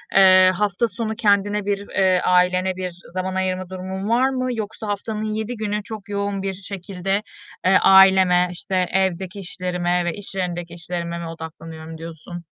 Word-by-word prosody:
eee, 185 -1 +7
hafta 210 +4 +1
sonu 220 -1 -4
kendine 205 -2 +2
bir, 200 0 -2
eee, 185 -2 +2
ailene 180 +1 +3
bir 185 0 -3 0.2
zaman 185 0 -3
ayırma 185 -1 -1
durumun 190 +2 -5
var 250 +3 +3
mı? 255 -1 -2
Yoksa 220 0 -5
haftanın 210 +1 -3
7 220 +3 -3
günü 210 -1 -2
çok 210 -1 -8
yoğun 200 -1 -2
bir 195 -1 -2
şekilde, 195 +1 -3 0.4
eee, 190 - +6
aileme, 190 -2 +6
işte, 185 +2 -5
evdeki 185 +1 0
işlerime 180 -1 -1
ve 175 - -1
iş 205 -1 -7
yerindeki 175 -2 -3
işlerime 170 0 -4
mi 170 - -5
odaklanıyorum 160 0 -9
diyorsun? 165 +1 -9
190 Hz, 160 wpm, -22 LUFS, 180-205 Hz, 0.4 s, eee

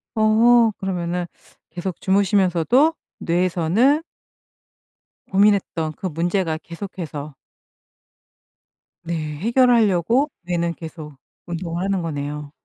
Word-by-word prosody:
어 225 +1 +5
그러면은 180 -2 -2 0.4
계속 175 +2 -5
주무시면서도 195 - +3 0.3
뇌에서는 180 - +2 1.3
고민했던 190 -5 +2
그 190 - -3
문제가 170 0 -1
계속해서 165 -5 -7 1.7
네 170 +1 -4 0.2
해결하려고 235 - +3
뇌는 170 -1 -1
계속 155 -3 -9 0.3
운동을 170 0 -4
하는 195 -1 0
거네요. 145 -2 -5
180 Hz, 225 characters per minute, -21 LUFS, 165-210 Hz, 1.7 s, 어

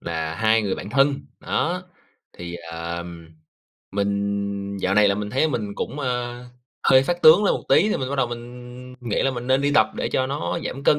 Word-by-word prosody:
là 80 -1 -3
hai 110 +3 +3
người 100 - -1
bạn 100 - -7
thân. 140 +3 +3 0.3
Đó, 180 +3 -1 0.6
thì, 85 0 -6 0.2
ờm, 85 0 -6 0.6
mình 100 0 -2
dạo 95 - +1
này 105 0 +5
là 100 - +2
mình 105 0 -4
thấy 145 +6 +2
mình 105 -7 -3
cũng, 150 - -4
ơ, 125 -2 -3 0.4
hơi 130 0 +6
phát 175 +4 -2
tướng 160 +7 +8
lên - - +3
một - - -5
tí 210 - +5
thì - - +1
mình 130 - -3
bắt 140 - -2
đầu 135 - +2
mình 125 +1 -9
nghĩ 120 -3 -1
là 135 - +2
mình 120 -1 -6
nên 130 +1 +3
đi 145 0 +1
tập 110 0 +4
để - - -2
cho 130 - 0
nó 145 +5 -2
giảm 135 - -5
cân, 150 - +4
120 Hz, 215 wpm, -23 LUFS, 100-135 Hz, 0.6 s, tướng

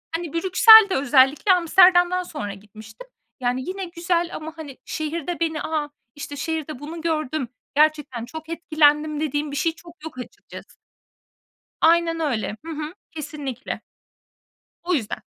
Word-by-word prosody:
Hani, 335 -3 -5
Brüksel 395 +5 +7
de 375 - 0
özellikle 275 +6 +3
Amsterdam'dan 360 +1 +4
sonra 210 - -6
gitmiştim. 215 - -14 0.3
Yani, 250 0 -1
yine 385 0 -4
güzel 340 0 -1
ama, 315 +1 -7
hani, 290 -5 -9
şehirde 325 +2 -4
beni 320 -2 -1
A! 305 -2 -2 0.3
İşte, 290 0 -7
şehirde 310 -1 -4
bunu 320 +3 -8
gördüm, 310 -4 -2 0.3
gerçekten 295 -6 +1
çok 315 +5 -10
etkilendim 305 -2 +2
dediğim 295 -1 -2
bir - - -5
şey 330 +3 +1
çok 340 -2 -17
yok 320 - -9
açıkçası. 250 - -11 1.1
Aynen 330 0 +3
öyle, 220 -10 -2
hı 330 - -6
hı. 305 +1 -5 0.2
Kesinlikle. 290 -4 -6 1.1
Bu 360 - +1
yüzden. 225 -9 -2
310 Hz, 135 wpm, -22 LUFS, 285-335 Hz, 1.1 s, Brüksel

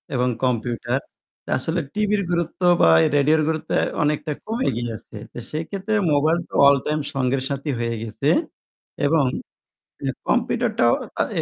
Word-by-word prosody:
এবং 125 +1 +2
কম্পিউটার। 120 0 0 0.6
আসলে 160 +7 -2
টিভির 210 -1 +1
গুরুত্ব 170 +1 -2 0.2
বা - - +6 0.3
রেডিওর 150 +3 +4
গুরুত্ব 160 0 -2 0.3
অনেকটা 150 +1 0
কমে 230 +4 -1
গিয়ে 120 0 -3
আছে। 105 - -13 0.2
তো - - -10
সেক্ষেত্রে 190 +7 -3 0.2
মোবাইল 155 +4 +3
তো - - -20
all 140 0 +7
time 150 0 0
সঙ্গের 135 -1 0
সাথী 140 +1 -3
হয়ে 115 0 -1
গেছে 110 - -2 0.8
এবং 150 -1 +3 1.0
কম্পিউটারটাও - - +2 0.3
আ - - +5 0.2
এ - - +2
150 Hz, 135 wpm, -22 LUFS, 125-165 Hz, 1.0 s, all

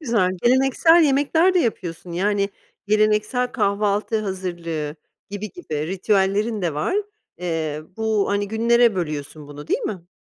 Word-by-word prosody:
güzel. 230 - +1
Geleneksel 270 +7 +5
yemekler 300 +6 +3
de - - +4
yapıyorsun. 175 - -3
Yani, 200 +2 +1 0.4
geleneksel 215 +4 +1
kahvaltı 210 -1 0
hazırlığı 170 -6 -4 0.3
gibi 205 +1 -5
gibi 155 - -5
ritüellerin 200 +3 0
de 165 -4 -1
var. 255 - -1 0.4
Eee, 160 -4 -3
bu 220 -2 0
hani 200 0 0
günlere 235 +1 +3
bölüyorsun 150 -3 -4
bunu, 145 +1 -10
değil - - +1
mi? 180 -4 -5
205 Hz, 130 wpm, -22 LUFS, 175-230 Hz, 0.4 s, Geleneksel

